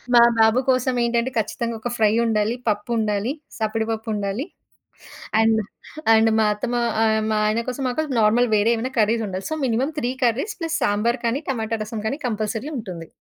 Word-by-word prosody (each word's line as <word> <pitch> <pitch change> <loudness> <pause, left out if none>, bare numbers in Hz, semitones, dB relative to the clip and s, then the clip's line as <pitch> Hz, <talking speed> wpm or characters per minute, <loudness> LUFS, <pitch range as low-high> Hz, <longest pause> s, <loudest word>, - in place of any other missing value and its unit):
మా 235 - +9 0.2
బాబు 220 +2 +5
కోసం 255 0 +1
ఏంటంటే 235 +2 0
ఖచ్చితంగా 230 +2 -2
ఒక 245 - -2
ఫ్రై 215 -1 +3
ఉండాలి. 220 0 +1
పప్పుండాలి, 210 +2 -1 0.3
సప్పిడి 220 0 -1
పప్పుండాలి. 220 +2 -3 1.0
అండ్, 225 0 +3 0.5
అండ్ 225 0 +4
మా - - +4
అత్తమ్మ 240 +4 -3 0.3
ఆహ్, 220 -1 +3
మా 215 - +1
ఆయన 220 +2 +1
కోసం 265 +2 -4
మాకు 310 +6 -1 0.2
నార్మల్ 230 +3 +3
వేరే 215 +3 +3
ఏమైనా 255 +4 -3
కర్రీస్ 220 +1 +2
ఉండాలి. 185 0 -5
So, 315 - -1
minimum 250 +4 0
3 245 +1 -1
curries 265 - 0
plus 330 0 -1
sambar 230 +4 +1
కానీ, 240 +5 0
టమాటా 225 -3 -2
రసం 215 0 -5
కానీ 275 - -2
కంపల్సరీ 220 +5 -3
ఉంటుంది. 180 -7 -7
225 Hz, 170 wpm, -22 LUFS, 215-245 Hz, 1.0 s, మా